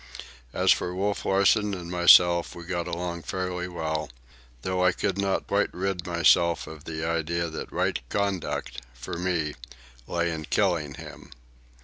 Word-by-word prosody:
As - - +3
for 90 0 +1
Wolf 100 +1 -1
Larsen 100 +1 +3
and 85 -2 -7
myself, 85 -1 +6
we 85 - -8
got 85 0 -3
along 85 0 -4
fairly 90 0 -3
well; 80 -3 -3 0.5
though 90 0 0
I 90 -1 +4
could 100 -1 -2
not 100 -1 0
quite - - +1
rid 90 -1 -2
myself 85 0 +3
of 80 -1 -11
the 80 0 -4
idea 85 +1 -1
that 80 - -6
right - - 0
conduct, 100 -9 -2
for 85 +8 -6
me, 85 -4 -1 0.5
lay 85 0 0
in 80 -1 -5
killing 80 -6 0
him. - - -11
85 Hz, 150 wpm, -26 LUFS, 85-95 Hz, 0.5 s, myself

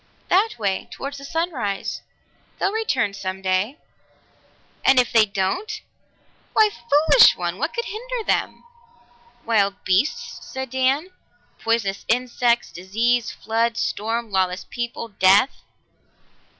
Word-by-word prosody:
That 415 +5 +3
way 200 -4 -1
toward 275 +1 -6
the 275 0 -9
sunrise. 280 - -3 0.6
They'll 390 - 0
return 265 - 0
some 190 -1 -5
day." 190 +9 0 1.1
"And 265 -1 +6
if 245 - +2
they 220 -2 +6
don't?" 360 - -2 0.7
"Why, 430 -1 +5 0.2
foolish 300 +11 +6
one! - - -3
What - - -2
could 470 - -2
hinder 485 +2 -5
them?" - - -1 0.8
"Wild 200 -3 +1
beasts," 240 +4 0
said 265 -2 -6
Dan. 265 +6 +1 0.5
"Poisonous 225 -4 -1
insects, 240 0 +1
disease, 230 +6 0
flood, 230 +1 -1
storm, 225 +1 -2
lawless 185 -1 0
people, 240 -1 -4
death!" 200 +5 +3
235 Hz, 115 wpm, -22 LUFS, 200-280 Hz, 1.1 s, And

